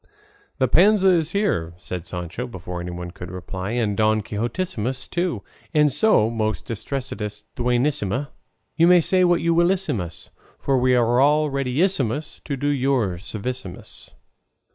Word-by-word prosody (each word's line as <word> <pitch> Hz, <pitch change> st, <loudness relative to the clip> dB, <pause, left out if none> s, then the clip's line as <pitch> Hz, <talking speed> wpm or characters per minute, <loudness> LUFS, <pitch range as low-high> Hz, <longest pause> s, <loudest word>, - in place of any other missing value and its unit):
"The 130 Hz, -, +2 dB
Panza 190 Hz, -, +5 dB
is 165 Hz, -3 st, +2 dB
here," 175 Hz, -, 0 dB
said 90 Hz, -1 st, -6 dB
Sancho, 90 Hz, +8 st, -5 dB
before 90 Hz, -5 st, -6 dB
anyone 90 Hz, 0 st, -6 dB
could 90 Hz, -1 st, -9 dB
reply, 95 Hz, +3 st, -5 dB
"and 110 Hz, -4 st, 0 dB
Don 110 Hz, 0 st, +2 dB
Quixotissimus 120 Hz, -, -3 dB
too; 175 Hz, 0 st, -2 dB, 0.3 s
and 150 Hz, -1 st, +5 dB
so, 170 Hz, -, +4 dB
most 110 Hz, -2 st, -2 dB
distressedest 110 Hz, -3 st, -5 dB
Duenissima, 125 Hz, 0 st, 0 dB, 0.4 s
you 165 Hz, +3 st, +5 dB
may 180 Hz, 0 st, +7 dB
say 185 Hz, +3 st, +3 dB
what 175 Hz, -1 st, +3 dB
you 170 Hz, 0 st, +2 dB
willissimus, 165 Hz, -, 0 dB, 0.3 s
for 135 Hz, -2 st, +1 dB
we 125 Hz, 0 st, +3 dB
are 120 Hz, 0 st, +3 dB
all 150 Hz, +2 st, +3 dB
readissimus 140 Hz, -, 0 dB
to 140 Hz, -2 st, -3 dB
do 145 Hz, +2 st, -1 dB
you 135 Hz, -1 st, +2 dB
any 95 Hz, -6 st, -1 dB
servissimus." 110 Hz, +1 st, -7 dB
125 Hz, 140 wpm, -23 LUFS, 105-150 Hz, 0.4 s, may